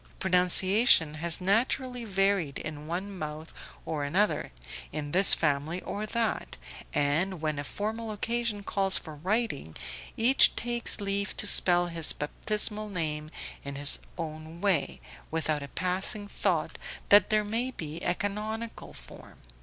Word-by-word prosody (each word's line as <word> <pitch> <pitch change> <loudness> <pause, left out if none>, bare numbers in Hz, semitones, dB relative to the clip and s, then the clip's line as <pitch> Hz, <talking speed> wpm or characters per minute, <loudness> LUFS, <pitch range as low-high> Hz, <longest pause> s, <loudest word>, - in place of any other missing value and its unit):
Pronunciation 185 - +4
has 165 +2 -1
naturally 240 +5 0
varied 195 -7 0
in 150 -1 -7
one 190 +4 -4
mouth 155 -1 -7 0.3
or 150 -3 -3
another, 185 +9 0 0.4
in 145 -1 -5
this 190 +4 +6
family 150 +3 -1
or 210 +1 -5
that, 230 +1 -2 0.3
and 160 +6 0
when 155 -2 -2
a - - -3
formal 220 +8 -4
occasion 225 0 -2
calls 195 -2 0
for 155 - -8
writing, 185 - -2 0.4
each 245 +4 +5
takes 240 0 +1
leave 200 0 -2
to - - +2
spell 175 -3 +6
his 165 -2 +2
baptismal 210 +7 0
name 155 -5 -3 0.3
in 140 0 -6
his 145 +1 +3 0.2
own 160 0 -7
way, 190 -6 0 0.3
without 155 -2 -1
a 140 - -7
passing 185 +6 0
thought - - -2 0.3
that 205 -1 +7
there 215 -1 +2
may 230 +5 -1
be 160 -9 -7
a 175 - 0
canonical 215 +3 -5
form. - - -13
185 Hz, 140 wpm, -28 LUFS, 155-210 Hz, 0.4 s, that